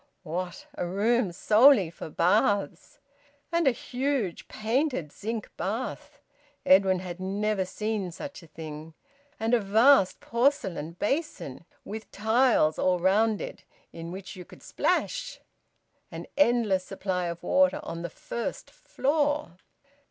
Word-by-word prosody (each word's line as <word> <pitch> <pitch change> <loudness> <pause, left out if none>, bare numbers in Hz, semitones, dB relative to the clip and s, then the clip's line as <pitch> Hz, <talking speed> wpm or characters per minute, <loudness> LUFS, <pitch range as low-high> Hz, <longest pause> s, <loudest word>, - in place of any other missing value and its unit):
What! 175 +2 -5
A 175 - -3
room 210 +2 +1
solely 215 - +5
for 165 - -8
baths! 195 +2 +1 0.5
And 335 -3 +2
a - - +6
huge 250 -5 -2
painted 225 - -1
zinc 220 +4 -5
bath! 250 +7 -4 0.5
Edwin 190 0 +5
had 180 -1 -7
never 200 +1 -1
seen 210 -1 -3
such 280 - -8
a 165 - -15
thing. 155 0 -9 0.4
And 225 +2 0
a 245 - +5
vast 220 +1 +4
porcelain 205 - 0
basin, 205 - -3 0.2
with 220 +1 -7
tiles 220 -6 +2
all 185 -1 +2
round 205 +4 +2
it, - - -7 0.3
in 165 0 -7
which 190 +2 -8
you 180 - -8
could - - -16
splash! - - -1 0.7
An - - -7
endless 230 -8 +3
supply 185 -2 -3
of 170 +1 -6
water 280 +9 +3
on 165 - -6
the 175 - -4
first 235 +8 -6
floor! 290 - -1
205 Hz, 130 wpm, -27 LUFS, 180-245 Hz, 0.7 s, a